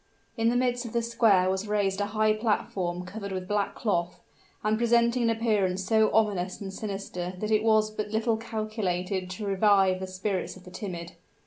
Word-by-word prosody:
In 230 -1 +2
the 240 - +1
midst 245 0 +1
of 230 - -7
the 235 -1 +1
square 220 -5 +3
was 190 +2 -1
raised 205 -1 0
a 205 - 0
high 215 0 +2
platform 190 -5 -1
covered 200 +1 -6
with 185 -1 -4
black 205 0 -1
cloth, 175 -5 -1 0.4
and 215 +1 +2
presenting 235 +1 +3
an 230 - +2
appearance 210 -5 +1
so 220 +2 +3
ominous 200 -4 +1
and 195 -2 -6
sinister 195 -3 -5
that 215 +3 -3
it 215 -1 +4
was 215 -1 +3
but 215 0 -3
little 220 +1 +1
calculated 205 -5 -3
to 185 +3 -5
revive 195 -1 +3
the 190 - -4
spirits 185 0 -3
of 185 - -14
the 180 - -12
timid. 175 -4 -6
205 Hz, 190 wpm, -27 LUFS, 185-220 Hz, 0.4 s, it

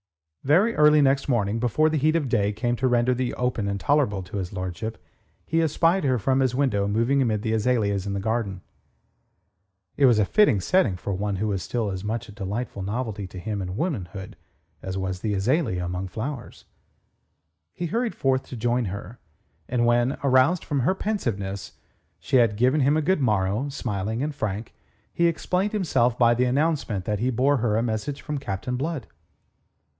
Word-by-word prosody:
Very 185 +12 +4
early 150 0 +6
next 135 +1 +2
morning, 110 -3 +1
before 125 +6 +2
the 155 -1 +1
heat 155 +3 +2
of 165 - +2
the 135 - -4
day 105 -4 +2
came 120 +3 -1
to 130 - +1
render 120 0 +2
the 125 0 -2
open 125 -4 -1
intolerable 105 0 +1
to 95 - -7
his 90 -2 -4
lordship, 95 +4 -5 0.5
he 165 +1 +1
espied 165 +3 +2
her 130 -3 +2
from 130 +5 +1
his 130 -2 +1
window 120 -8 +1
moving 115 +7 +2
amid 110 -4 0
the 110 -2 0
azaleas 105 -4 +1
in 100 - -2
the 100 - -2
garden. 105 -3 -2 1.4
It 140 - +6
was 120 -3 +5
a 105 - +3
fitting 205 - +4
setting 115 - +2
for 100 +2 -4
one 100 +1 -2
who 105 +3 -1
was 95 -2 -1
still 110 +1 -2
as 95 0 -5
much 115 +3 -3
a - - -11
delightful 105 +1 -4
novelty 105 0 -3
to 95 - -11
him 105 +2 -3
in 90 +1 -5
womanhood 100 - -4 0.5
as 95 0 -4
was 95 -1 -3
the 105 +1 -1
azalea 110 - 0
among 90 +2 -3
flowers. 120 +7 -6 1.1
He 175 - -5
hurried 230 +6 -1
forth 130 -1 +1
to - - -7
join 120 +1 0
her, 100 +4 -7 0.5
and 120 -1 +1
when, 120 +2 +2
aroused 135 +6 +3
from 145 -3 -1
her 140 +10 +2
pensiveness, 100 - -3 0.5
she 130 - +1
had 115 -4 +4
given 130 +7 +2
him 140 +3 +3
a 155 - 0
good 185 -1 +1
morrow, 105 +2 +1
smiling 110 -3 -3
and 150 0 -2
frank, 110 -5 -4 0.4
he 170 - +3
explained 180 +5 -1
himself 125 - +1
by 120 -1 +5
the 125 +2 +1
announcement 130 - 0
that 105 -1 -1
he 125 +4 +1
bore 130 +4 +2
her 110 -3 +1
a 115 - +1
message 115 +4 -3
from 150 -2 -3
Captain 115 +2 -4
Blood. 145 +1 -3
120 Hz, 190 wpm, -25 LUFS, 100-140 Hz, 1.4 s, early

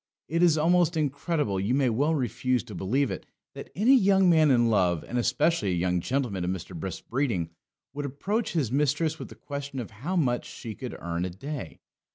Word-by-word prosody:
It 165 +3 0
is 170 -3 +5
almost 170 +1 +3
incredible: 145 - -1
you 105 +7 +1
may 135 -2 +2
well 140 +8 +1
refuse 125 -2 0
to 115 -3 -10
believe 120 +10 0
it - - -6 0.3
that - - -9
any 235 +8 +5
young 195 -5 +5
man 160 -2 +5
in 120 -3 +4
love, 90 -6 +2
and 125 - -1
especially 125 - +1
a - - 0
young 90 +1 +1
gentleman 120 -3 -1
of 90 - -1
Mr. 95 -2 -5
Brisk's 85 +2 -5
breeding, 115 - -1 0.4
would 145 0 -3
approach 200 - -2
his 145 -9 0
mistress 150 +3 +1
with - - -6
the - - -11
question 140 -1 -6
how 125 - -4
much 125 -8 +1
she 115 - -7
could - - -7
earn 85 0 -3
a 90 - -2
day. 115 - -7
135 Hz, 200 wpm, -27 LUFS, 100-155 Hz, 0.4 s, is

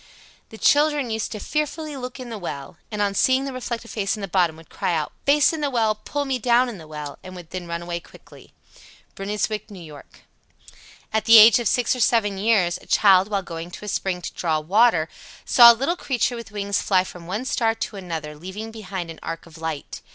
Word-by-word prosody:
The 220 - -11
children 290 -1 +3
used 220 -1 -2
to 215 - -5
fearfully 300 +3 -3
look 255 0 -7
in 250 -2 -8
the 220 - -5
well, 145 -3 -7
and 210 -1 -1
on 200 -1 0
seeing 260 +6 +2
the 270 - -5
reflected 235 -2 -5
face 200 -2 -1
in - - -7
the 195 - -4
bottom, 175 -3 +1
would 165 - -15
cry 175 - -1
out, 155 -2 -2 0.2
"Face 290 +2 +5
in 320 - -4
the 290 - 0
well, 225 -4 +1
pull 285 +7 -4
me 265 -2 -1
down 245 +2 +3
in 215 -6 -8
the 160 - -12
well," 150 -2 -7
and 185 0 -10
would 175 -3 -11
then 185 -2 -6
run 170 0 -4
away 170 0 -4
quickly. - - -17 0.6
Bruynswick, 210 +1 -3
N.Y. 190 -4 -10 0.2
86. - - -19 0.9
At 220 0 0
the 230 0 +9
age 220 +1 +9
of 235 - -1
six 245 +4 +2
or - - -6
seven 205 -5 +2
years, 195 -5 +2
a - - -18
child, 195 -2 +5
while 200 -2 -2
going 165 0 -7
to 195 - -10
a - - -8
spring 185 -3 -2
to - - -5
draw 160 -3 0
water, 180 0 +3 0.4
saw 235 -1 +9
a - - +1
little 275 +9 -1
creature 250 -6 -1
with 235 -3 -8
wings 200 -1 -1
fly 185 -2 +2
from 175 -2 -11
one 205 +8 -3
star 225 -3 +1
to 220 - -5
another, 165 -5 -6
leaving 190 +8 -7
behind 190 -6 -6
an 160 - -12
arc 165 - -6
of 165 -1 -15
light. 160 -3 -5
205 Hz, 225 wpm, -23 LUFS, 175-235 Hz, 0.9 s, the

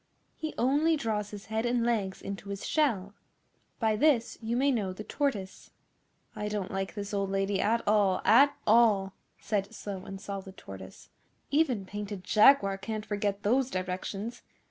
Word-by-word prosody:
'He 315 -1 -5
only 295 +6 +3
draws 215 -5 -2
his 205 -1 -9
head 220 0 -2
and 240 -1 +1
legs 205 -5 -1
into 200 0 -6
his 200 -1 -5
shell. 215 -11 +1 0.7
By 220 -2 +2
this 245 -1 +2
you 230 +2 -1
may 275 +2 +3
know 205 -7 -1
the 210 - -8
tortoise.' 215 -9 -3 0.7
'I 210 - -3
don't 210 -3 -3
like 195 0 -3
this 205 0 -5
old 200 -1 0
lady 195 0 0
at 230 +2 +1
all 205 -3 +3
at 280 +5 +6
all,' 210 -4 +4 0.3
said 205 -1 -2
Slow 195 -3 -6
and 195 0 -7
Solid 195 -2 -7
Tortoise. 95 -1 -11 0.4
'Even 275 -9 +2
Painted 205 -1 -6
Jaguar 205 -2 +5
can't 215 +1 -4
forget 205 -1 -2
those 255 +5 +2
directions. 190 +4 -4
210 Hz, 160 wpm, -29 LUFS, 195-235 Hz, 0.7 s, at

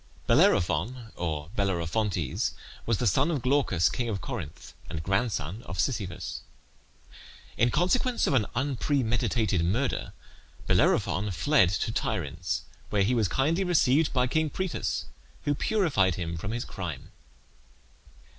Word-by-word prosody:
Bellerophon, 105 +8 +2
or 80 -2 -3
Bellerophontes, 95 - 0 0.3
was 115 -2 +2
the 125 - -1
son 135 - +3
of 145 -7 -1
Glaucus, 125 - +3
king 120 +10 -2
of 100 -3 -2
Corinth, 100 - -7 0.2
and 80 -1 -4
grandson 95 - -1
of 85 0 -6
Sisyphus. 95 -4 -2 1.1
In 120 - +3
consequence 235 - +2
of - - +1
an 115 -6 +3
unpremeditated 120 - +1
murder 115 +11 -1 0.5
Bellerophon 100 +7 +2
fled 95 - +3
to 95 +4 -1
Tiryns, 85 -4 -2 0.3
where 100 -2 +2
he 115 +6 +2
was 115 -4 +2
kindly 155 - +1
received 160 -4 +3
by 125 -2 +2
King 155 +4 +1
Proetus, 185 +2 -2 0.4
who 145 - +1
purified 145 - +2
him 85 -2 -3
from 85 +4 -5
his 120 +2 -3
crime. 85 -8 -6
110 Hz, 125 wpm, -28 LUFS, 90-135 Hz, 1.1 s, son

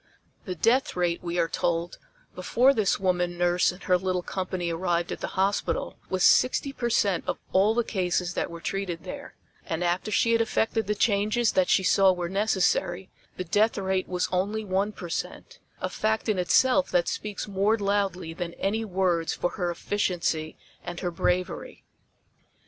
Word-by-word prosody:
The 185 - -4
death 235 +9 +2
rate, 175 -1 0
we 175 0 -3
are 170 -1 +2
told, 170 -1 -2 0.3
before 245 +9 +3
this 215 -6 +1
woman 180 -2 0
nurse 175 0 +2
and 180 - -13
her 180 -1 +3
little 185 -1 -1
company 185 -2 -3
arrived 170 0 -1
at - - -4
the - - -5
hospital 195 +2 0
was 185 -1 0
sixty 275 +2 +3
percent 215 -8 +1
of - - -1 0.2
all 200 +4 +4
the 240 - +2
cases 180 -4 -1
that - - -2
were 170 0 -9
treated 185 -4 -3
there - - -8 0.3
and 165 +1 -3
after 175 +4 0
she 230 +2 +2
had 230 0 +3
effected 225 0 0
the 210 - 0
changes 215 +2 +2
that 185 -1 +2
she 190 - +4
saw 195 0 +5
were 175 -1 -3
necessary, 190 -2 0 0.3
the 185 - -2
death 215 +6 +2
rate 190 -1 -1
was 180 -1 -1
only 205 +4 -1
one 195 +2 0
percent 175 -4 -6 0.2
a - - 0
fact 220 +1 -1
in 210 -4 +1
itself 260 +9 +3
that 175 -1 +1
speaks 210 -1 -4
more 205 +2 +1
loudly 195 -5 -1
than 170 0 -5
any 220 +3 -1
words 180 -5 0
for 175 - -1
her 180 -4 -2
efficiency 170 -3 -2 0.3
and 175 0 -6
her 180 - -2
bravery. 180 +2 -2
185 Hz, 170 wpm, -26 LUFS, 175-205 Hz, 0.3 s, saw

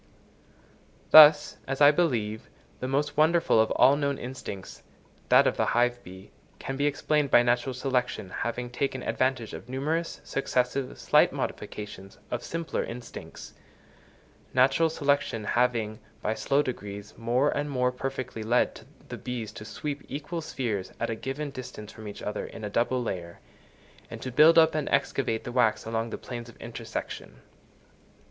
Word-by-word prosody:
Thus, 150 -1 +9
as 135 0 -3
I 145 0 +8
believe, 115 -10 -1 0.3
the 130 - -3
most 145 +2 0
wonderful 160 -6 +4
of 110 - +1
all 135 - +5
known 140 -1 -1
instincts, 125 -6 -7 0.5
that - - +7
of - - +1
the - - +2
hive 120 0 +2
bee, 95 +1 -12 0.3
can 135 - -5
be 140 +2 +1
explained 145 0 +1
by 120 - +6
natural 120 +2 +1
selection 125 -7 -1
having 120 +3 -3
taken 135 +2 -2
advantage 130 -3 -1
of 125 - -9
numerous, 155 +6 -2
successive, 130 0 -1
slight - - +4
modifications 100 -2 -6
of 120 - -3
simpler 165 -1 -3
instincts; 120 +1 -9 1.0
natural 135 +6 +4
selection 140 -7 0
having, 115 -2 0 0.2
by 110 - +1
slow 140 +5 +1
degrees, 105 -5 -6
more 120 +5 +1
and 145 +1 -2
more 125 -2 +1
perfectly 130 -3 -5
led 120 +3 +1 0.3
the - - -5
bees 120 -4 -5
to 105 - -9
sweep 145 +4 -5
equal 150 +4 -4
spheres 115 -10 -3
at 115 - -1
a - - -2
given 135 +5 -4
distance 120 -5 -8
from 110 -1 -10
each 100 - -8
other 105 - -3
in 110 - -10
a 105 - -4
double 125 +3 +1
layer, 85 -6 -5 0.7
and - - -8
to 130 - -4
build 155 +6 +6
up 160 -1 +6
and 155 -2 -2
excavate 135 -4 0
the 120 - -6
wax 120 -3 +2
along 115 +1 -2
the - - -5
planes 120 -2 -7
of - - -15
intersection. 115 -1 -7
125 Hz, 155 wpm, -27 LUFS, 115-140 Hz, 1.0 s, Thus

